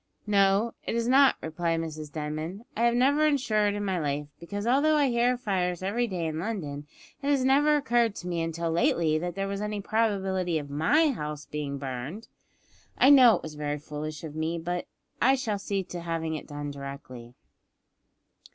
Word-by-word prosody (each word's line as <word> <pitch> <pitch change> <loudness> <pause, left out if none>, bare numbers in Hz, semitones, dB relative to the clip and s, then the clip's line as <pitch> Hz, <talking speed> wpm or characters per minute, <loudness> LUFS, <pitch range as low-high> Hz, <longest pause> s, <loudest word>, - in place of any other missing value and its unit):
"No, 200 +2 +3
it - - -3
is 235 0 0
not," 270 +2 +6
replied 165 +1 -1
Mrs 155 -2 -6
Denman. 155 +7 -5
"I 230 - +2
have 235 0 +3
never 285 +5 +4
insured 215 -8 +1
in 205 0 -3
my 190 -2 0
life, 145 -1 -2
because 205 +5 -5
although 285 +6 +3
I 290 -3 +3
hear 240 +1 +2
of 245 - -13
fires 185 -5 -1
every 235 +5 0
day 180 -5 -3
in 160 0 -3
London, 155 -8 -4 0.3
it 280 - -1
has 275 -3 +2
never 290 +3 +4
occurred 240 -6 +2
to 180 - -7
me 170 -2 -1
until 165 0 -2
lately 165 -1 +2
that 175 +1 -4
there 195 0 -2
was 200 0 -3
any 210 0 -3
probability 195 -5 0
of 145 -2 -6
my 290 - +3
house 150 - -5
being 145 -2 -4
burned. 135 - -6 0.7
I 270 - +6
know 255 -5 +8
it - - -6
was 155 - -7
very 150 0 -3
foolish 150 +1 -6
of 155 -2 -6
me, 160 +2 -2
but 175 +2 -3 0.3
I 265 +3 +5
shall 220 -6 -2
see 195 -1 -2
to 180 -1 -7
having 165 -1 -2
it 155 - -6
done 145 -1 -5
directly." 140 -4 -9
180 Hz, 190 wpm, -27 LUFS, 155-230 Hz, 0.7 s, know